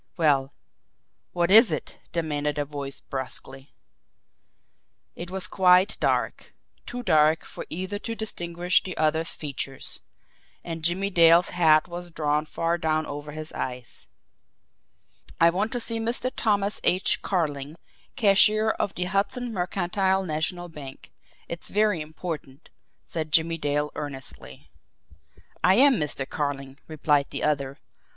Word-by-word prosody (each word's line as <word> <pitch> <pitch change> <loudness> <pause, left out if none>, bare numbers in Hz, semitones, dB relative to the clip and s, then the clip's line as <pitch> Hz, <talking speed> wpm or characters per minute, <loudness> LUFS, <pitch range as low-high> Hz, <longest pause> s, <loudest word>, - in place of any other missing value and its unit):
"Well, 140 -5 +2 0.8
what 175 0 0
is 220 -1 +8
it?" 155 - -4
demanded 150 -3 -2
a 145 - 0
voice 140 -1 -5
brusquely. 135 +1 -4 1.4
It 170 +1 -7
was 190 0 +1
quite 185 0 +4
dark, - - -1 0.3
too 245 0 -5
dark 155 -3 +3
for - - -9
either 185 +5 -4
to 230 +2 -5
distinguish 175 -5 0
the 185 - -7
other's 160 +1 +2
features 140 -2 -5 0.6
and 165 -1 -5
Jimmie 190 +4 0
Dale's 170 0 +6
hat 160 -3 +4
was 175 0 -7
drawn 150 -1 -1
far 165 +2 -1
down 155 -1 0
over 145 +1 -7
his 155 +1 -7
eyes. 125 -1 -6 1.3
"I 165 0 +6
want 205 +6 -1
to 245 - -1
see 230 -1 -2
Mr. 235 +3 -1
Thomas 205 -2 0
H. 185 +2 +2
Carling, 150 -5 -2 0.4
cashier 215 0 +5
of 200 - -3
the 180 - -2
Hudson 205 +6 -1
Mercantile 190 +1 0
National 170 +2 -2
Bank 145 -5 -11 0.4
it's 170 - -5
very 210 -4 +1
important," 150 -3 -7 0.3
said 155 -2 -5
Jimmie 165 +1 +2
Dale 145 0 -1
earnestly. 135 -3 -7 0.9
"I 185 - +6
am 265 +1 +6
Mr. 145 -4 -2
Carling," 140 -2 -4
replied 150 -2 +1
the - - -5
other. 140 -2 0
165 Hz, 130 wpm, -25 LUFS, 150-190 Hz, 1.4 s, is